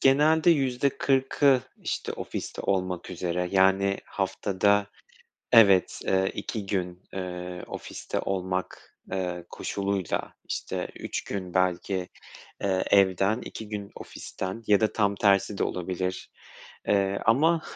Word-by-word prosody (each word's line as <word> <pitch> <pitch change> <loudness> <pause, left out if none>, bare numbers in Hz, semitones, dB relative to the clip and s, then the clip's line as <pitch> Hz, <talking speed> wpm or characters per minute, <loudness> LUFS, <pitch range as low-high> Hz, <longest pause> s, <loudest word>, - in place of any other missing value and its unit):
Genelde 155 +5 +5
%40'ı 135 -1 +2 0.2
işte - - -3
ofiste - - -5
olmak 95 -2 -1
üzere, 90 0 -2
yani 95 +1 +3
haftada 100 +1 +1 0.7
evet, 100 -6 +6
eee, 95 0 +2
2 110 -4 -4
gün, 90 -2 -3
eee, 90 -1 -5
ofiste - - -5
olmak, 95 -1 -3
eee, 90 -2 -3
koşuluyla 100 -2 -2
işte - - -4
3 - - -4
gün 95 -3 -5
belki, 90 0 0 0.5
eee, 95 -2 +1
evden 100 +3 +4
2 110 -1 -8
gün 100 -1 -5
ofisten 95 +5 -6
ya 105 -1 +5
da 110 - +1
tam 100 -2 +2
tersi 100 0 +3
de - - +1
olabilir, 90 +1 -3 0.6
eee, 100 -1 +2
ama 155 +8 +4
95 Hz, 115 wpm, -27 LUFS, 95-110 Hz, 0.7 s, evet